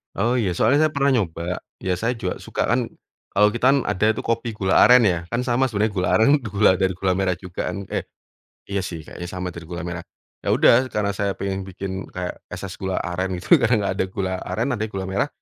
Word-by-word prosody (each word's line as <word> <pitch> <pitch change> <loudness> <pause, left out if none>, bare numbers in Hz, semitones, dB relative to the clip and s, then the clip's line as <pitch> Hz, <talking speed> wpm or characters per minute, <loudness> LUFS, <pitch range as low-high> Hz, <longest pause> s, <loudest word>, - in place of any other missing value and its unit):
Oh 120 +2 +1
iya, 90 -6 0
soalnya 145 +9 +4
saya 155 - -9
pernah 140 0 +3
nyoba, 90 -6 -1 0.2
ya 95 - +1
saya 120 +2 0
juga 110 -6 -4
suka - - -3
kan 120 0 +1 0.5
kalau 105 +1 +5
kita 120 - -1
kan 140 - +5
ada 100 +4 0
itu - - -3
kopi 115 0 -1
gula 95 -2 +2
aren 125 -1 +7
ya, 90 -5 +3
kan 120 +1 -1
sama 125 +1 +2
sebenarnya 110 -2 0
gula 90 -2 0
aren 110 +4 +4
gula 105 -5 +3
dari 95 -1 +1
gula 95 0 0
merah 95 -2 +1
juga 90 -2 -5
kan 100 - -5
eh - - -2 0.6
iya 100 0 0
sih, 85 -4 -6
kayaknya 90 +3 -8
sama 90 -1 -4
dari 85 -1 -9
gula 90 0 -5
merah. 85 -1 -5 0.4
Ya - - -4
udah 130 +2 +5
karena 100 -1 0
saya 100 0 -1
pengen 95 0 -2
bikin 95 +1 -5
kayak 90 -1 -5
es 90 - -7
es 95 - -8
gula 95 -1 -2
aren 90 +2 -2
gitu - - -10
karena 120 +1 +3
nggak - - 0
ada - - +3
gula 95 -1 -2
aren, 115 +3 -2
ada 105 - -3
nya 110 - -1
gula 95 -2 -4
merah 95 +1 0
100 Hz, 235 wpm, -22 LUFS, 90-115 Hz, 0.6 s, aren